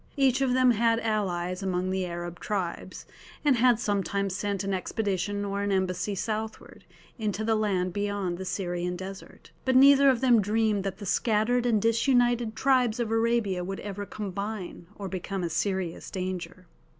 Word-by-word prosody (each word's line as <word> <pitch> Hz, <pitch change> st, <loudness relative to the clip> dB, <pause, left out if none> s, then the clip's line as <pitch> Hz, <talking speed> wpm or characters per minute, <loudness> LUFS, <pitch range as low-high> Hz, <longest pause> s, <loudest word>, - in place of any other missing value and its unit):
Each 270 Hz, -1 st, +3 dB
of 255 Hz, -2 st, +2 dB
them 255 Hz, -1 st, +5 dB
had 230 Hz, 0 st, +2 dB
allies 185 Hz, -4 st, -1 dB
among 185 Hz, -1 st, -1 dB
the 190 Hz, -1 st, -1 dB
Arab 175 Hz, 0 st, -6 dB
tribes, 190 Hz, -5 st, -4 dB, 0.4 s
and 280 Hz, -4 st, +4 dB
had 240 Hz, -1 st, +4 dB
sometimes 200 Hz, -3 st, -1 dB
sent 200 Hz, -1 st, -2 dB
an 195 Hz, 0 st, -2 dB
expedition 205 Hz, +1 st, -2 dB
or 200 Hz, 0 st, -2 dB
an 200 Hz, 0 st, -1 dB
embassy 190 Hz, +1 st, 0 dB
southward, 220 Hz, +2 st, -5 dB, 0.3 s
into 215 Hz, -1 st, -2 dB
the 225 Hz, +1 st, +2 dB
land 190 Hz, -4 st, 0 dB
beyond 205 Hz, -3 st, -2 dB
the -, -, -4 dB
Syrian 180 Hz, -2 st, -2 dB
desert. 190 Hz, +2 st, -10 dB
But 260 Hz, -1 st, +1 dB
neither 275 Hz, +1 st, +7 dB
of 255 Hz, -3 st, +2 dB
them 240 Hz, -3 st, +5 dB
dreamed 210 Hz, 0 st, +1 dB
that 195 Hz, -1 st, -3 dB
the 205 Hz, -, -8 dB
scattered 230 Hz, +4 st, +1 dB
and 225 Hz, -3 st, +3 dB
disunited 240 Hz, 0 st, +2 dB
tribes 250 Hz, -3 st, +2 dB
of 230 Hz, -2 st, -1 dB
Arabia 225 Hz, -5 st, +1 dB
would 195 Hz, +2 st, -5 dB
ever 205 Hz, 0 st, -5 dB
combine 200 Hz, -3 st, -5 dB
or 200 Hz, -, -6 dB
become 190 Hz, 0 st, -4 dB
a 170 Hz, -, -2 dB
serious 185 Hz, 0 st, -2 dB
danger. 185 Hz, -1 st, -5 dB
205 Hz, 165 wpm, -27 LUFS, 185-230 Hz, 0.4 s, neither